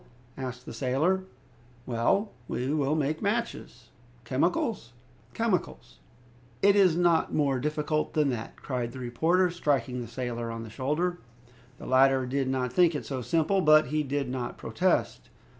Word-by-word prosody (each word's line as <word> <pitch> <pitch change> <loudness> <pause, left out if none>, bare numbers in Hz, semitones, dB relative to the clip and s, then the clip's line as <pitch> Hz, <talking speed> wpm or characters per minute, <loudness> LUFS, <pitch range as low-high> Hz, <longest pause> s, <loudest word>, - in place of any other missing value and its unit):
asked 125 -1 -6
the - - -8
sailor. 145 +11 0 0.6
"Well, 195 - +1 0.2
we 130 +4 -2
will 150 -1 +1
make 155 0 -1
matches. 200 - -3 0.3
"Chemicals?" 170 - -1 0.4
"Chemicals!" 225 -5 -2 0.6
"It 200 0 +6
is 185 -5 +4
not 175 -2 +2
more 140 -3 +1
difficult 150 +3 -1
than 150 -3 +3
that," 115 -2 -5
cried 125 -3 -4
the 130 - -8
reporter, 165 +9 +1
striking 140 -6 -1
the 120 - -6
sailor 120 -1 -4
on 115 0 -5
the 110 - -10
shoulder. 150 +8 -1 0.6
The - - -10
latter 130 0 +4
did 135 +1 -1
not 125 -2 -1
think 175 -1 +4
it 145 - -4
so 130 -2 -4
simple, 165 - +1
but 155 -3 +5
he 155 +1 0
did 140 -1 -2
not 125 -1 -4
protest. - - -1
140 Hz, 150 wpm, -28 LUFS, 125-170 Hz, 0.6 s, It